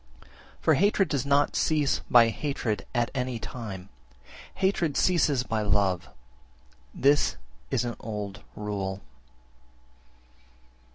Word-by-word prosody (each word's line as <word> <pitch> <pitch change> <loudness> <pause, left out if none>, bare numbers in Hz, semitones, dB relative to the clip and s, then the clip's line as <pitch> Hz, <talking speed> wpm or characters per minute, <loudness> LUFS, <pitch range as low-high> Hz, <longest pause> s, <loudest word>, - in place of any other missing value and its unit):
5. - - -24 0.3
For - - +4
hatred 200 -1 +3
does 140 -2 -1
not 140 +1 +3
cease 150 -3 +1
by 120 -2 +7
hatred 115 -5 -3
at 120 -2 0
any 125 -2 -2
time: 105 -6 -7 0.7
hatred 175 -7 +1
ceases 150 -8 +3
by 110 -3 -1
love, 100 -7 +1 0.8
this 140 - +3 0.3
is - - 0
an 120 -2 -3
old 105 -2 -5
rule. 100 -2 -4
120 Hz, 110 wpm, -27 LUFS, 105-145 Hz, 0.8 s, by